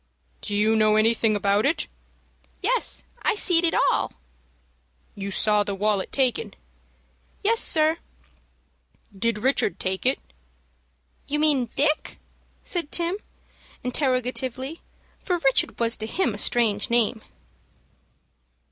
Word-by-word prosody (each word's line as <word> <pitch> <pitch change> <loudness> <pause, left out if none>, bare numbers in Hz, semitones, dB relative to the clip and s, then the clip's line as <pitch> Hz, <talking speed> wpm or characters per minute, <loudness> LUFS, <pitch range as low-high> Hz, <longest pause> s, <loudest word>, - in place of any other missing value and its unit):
"Do 205 - -3
you 215 +2 +3
know 215 -1 +4
anything 225 0 +3
about 200 +1 +2
it?" 300 +3 +1 0.8
"Yes, - - -1 0.2
I 450 - +1
seed 350 -4 +3
it 330 - +2 0.2
all." - - -1 1.0
"You 200 0 -5
saw 210 +1 +2
the 200 -1 -3
wallet 205 -1 0
taken?" 270 - 0 0.9
"Yes, 450 +3 +3
sir." 315 +1 +2 1.2
"Did 230 +2 0
Richard 210 -6 +1
take 190 +5 -1
it?" 265 - +3 1.1
"You 295 - -1
mean 290 -6 +2
Dick?" 300 +2 0 0.5
said 340 -5 -2
Tim, 345 +2 +2 0.7
interrogatively, 255 +2 -1 0.4
for 360 -3 -1
Richard 270 -6 +1
was 230 0 +2
to 220 - -5
him 245 - 0
a 205 - -5
strange 215 -4 +1
name. 235 -1 +2
245 Hz, 115 wpm, -24 LUFS, 215-310 Hz, 1.2 s, know